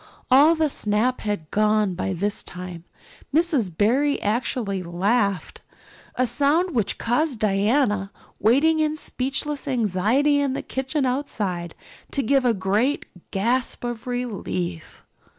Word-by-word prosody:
All 295 +6 +7
the 315 -1 +2
snap 230 -1 0
had 205 -8 -3
gone 210 -2 +2
by 190 +2 -2
this 200 +3 -1
time. 180 -2 -9 0.5
Miss 300 - +2
Barry 245 - +1
actually 210 -2 -1
laughed 195 +2 -1 0.5
a 255 - +2
sound 300 +8 +1
which 220 -5 0
caused 255 +3 0
Diana, 205 0 +1 0.3
waiting 285 +9 +3
in 310 0 +1
speechless 280 0 -2
anxiety 245 +5 +2
in 280 -2 0
the - - -4
kitchen 265 +2 -2
outside, 205 - -2 0.3
to 275 - -1
give 270 +2 +2
a 240 - +4
great 205 +9 0 0.2
gasp 240 +7 0
of 240 0 -5
relief. 185 - -4
235 Hz, 125 wpm, -23 LUFS, 200-275 Hz, 0.5 s, All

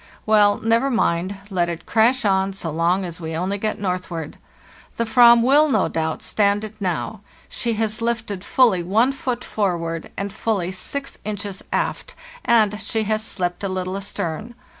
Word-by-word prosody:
Well, 205 -1 +5
never 230 +4 +2
mind, 190 -5 0
let 175 -2 +1
it 170 -1 -6
crash 235 +3 +3
on 195 -1 +2
so 170 -4 -5
long 170 +4 +1
as 170 0 -6
we 160 0 -4
only 190 +4 -2
get 215 +1 -2
northward. 180 -5 -4 0.6
The 230 - +1
Avram 235 0 +7
will, 290 +5 +5
no - - +2
doubt, 160 -1 -2
stand 205 0 +1
it 215 0 -6
now; 190 +3 -3 0.3
she 235 -1 -2
has 220 +1 -2
lifted 230 -5 -2
fully 225 -6 +3
one 215 +9 +2
foot 255 -3 -3
for 195 -5 0
ward 165 -1 -5
and 200 0 -3
fully 195 -6 -1
six 275 +9 -5
inches 205 -1 -5
aft, - - -2 0.3
and 215 -3 +3
she 220 -1 -1
has 215 +1 0
slipped 180 -3 -3
a 195 - -1
little 185 0 -3
astern. 200 +3 -5
205 Hz, 170 wpm, -22 LUFS, 180-225 Hz, 0.6 s, Avram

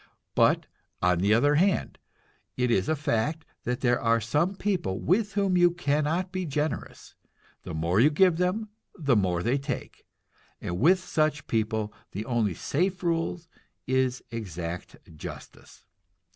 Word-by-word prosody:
But - - +3 0.4
on 90 -1 +3
the 100 +3 +2
other 145 +7 +4
hand, 195 -1 0 0.6
it 125 -1 +1
is 95 -4 +2
a 155 - +3
fact 150 +3 -1 0.2
that 125 0 -2
there 120 -1 +2
are 115 0 +3
some 150 - 0
people 180 - -1
with 205 - +1
whom 200 -2 +1
you 175 0 +6
cannot 165 +2 0
be 185 0 -2
generous; 150 +2 -3 0.5
the - - -7
more 85 +5 +1
you 135 +6 +6
give 170 +2 +4
them, 185 +5 0 0.3
the 140 - +2
more 90 -4 +1
they 125 +5 +1
take, 135 -1 -6 0.5
and 85 +1 -4
with 175 +9 +6
such 155 -5 0
people 110 -1 -1 0.2
the 105 +3 -4
only 115 -7 0
safe 180 - -1
rule 165 0 0 0.5
is 130 -1 0
exact 90 -6 -5 0.2
justice. - - -10
140 Hz, 145 wpm, -27 LUFS, 110-175 Hz, 0.6 s, you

